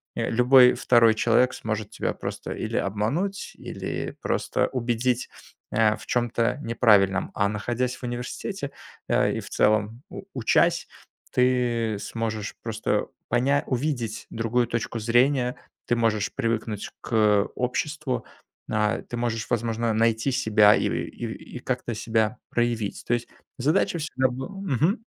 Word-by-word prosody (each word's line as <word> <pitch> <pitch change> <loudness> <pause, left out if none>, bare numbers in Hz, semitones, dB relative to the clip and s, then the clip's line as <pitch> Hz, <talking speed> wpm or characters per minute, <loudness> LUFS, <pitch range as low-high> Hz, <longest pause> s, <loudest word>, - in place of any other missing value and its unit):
э, - - -1
любой 125 +1 +7
2 115 -2 +4
человек 120 +3 +3
сможет 110 -1 -3
тебя - - -2
просто - - -6
или - - -3
обмануть, 120 - -1
или - - -5
просто - - 0
убедить, 120 0 0 0.4
а, 110 0 +3
в - - -12
чем-то 120 +1 0
неправильном. 105 -4 +3
А 100 - +2
находясь 120 +4 -2
в - - -18
университете, 125 - -4 0.4
э, - - +2
и, - - -2
в - - -10
целом, 110 +4 +1
у - - -8
учась, 115 -4 +2 0.4
ты 120 -4 +1
сможешь 110 -2 -3
просто 110 -1 -1 0.2
поня 135 +4 +2
увидеть 120 -5 -2
другую 115 +1 0
точку 115 -1 -3
зрения. 125 +3 +2 0.3
Ты 120 - +2
можешь 110 -3 0
привыкнуть 110 -2 -2
к 105 -3 +3
обществу, 130 0 -2 0.5
а, 105 0 +1
ты 120 - -7
можешь, 115 -1 -2
возможно, 115 0 0
найти 115 +3 +2
себя 105 -3 +5
и - - +1
и 120 +1 -5
и - - -6
как-то 125 -2 -3
себя 110 +2 0
проявить. 120 -3 -1
То 120 - +2
есть 120 - -5 0.3
задача 155 +5 +1
всегда 130 -4 0
был 130 +4 -5
Мгм. 185 - +1
120 Hz, 135 wpm, -25 LUFS, 110-125 Hz, 0.5 s, любой